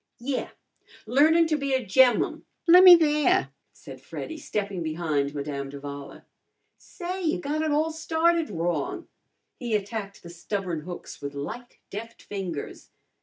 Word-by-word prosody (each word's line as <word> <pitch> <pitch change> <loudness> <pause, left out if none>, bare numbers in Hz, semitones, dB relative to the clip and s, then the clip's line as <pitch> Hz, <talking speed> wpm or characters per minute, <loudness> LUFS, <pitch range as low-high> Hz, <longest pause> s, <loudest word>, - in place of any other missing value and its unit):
"Yeah 255 +2 -3 0.6
learnin' 310 +8 +4
to 320 -1 +1
be 275 -1 0
a 260 -2 -1
gem'mum. 245 +5 +3 0.2
Lemme 360 +1 +10
there," 320 +3 +2 0.2
said - - -12
Freddy, 320 - -7
stepping 205 - -3
behind 155 -3 -1
Madame 140 -1 -4
d'Avala. 140 0 -9 0.5
"Say, 365 +1 -6
you've 325 -3 0
got 300 +2 -2
it 315 - 0
all 305 +2 +1
started 320 +1 +1
wrong." 165 -5 -2 0.5
He 240 -3 -1
attacked 205 -1 -4
the 170 - -10
stubborn 175 -1 -3
hooks 175 +3 -9
with 140 0 -6
light, 240 +13 -7
deft 225 +3 -8
fingers. 185 -7 -6
225 Hz, 135 wpm, -26 LUFS, -, 0.6 s, Lemme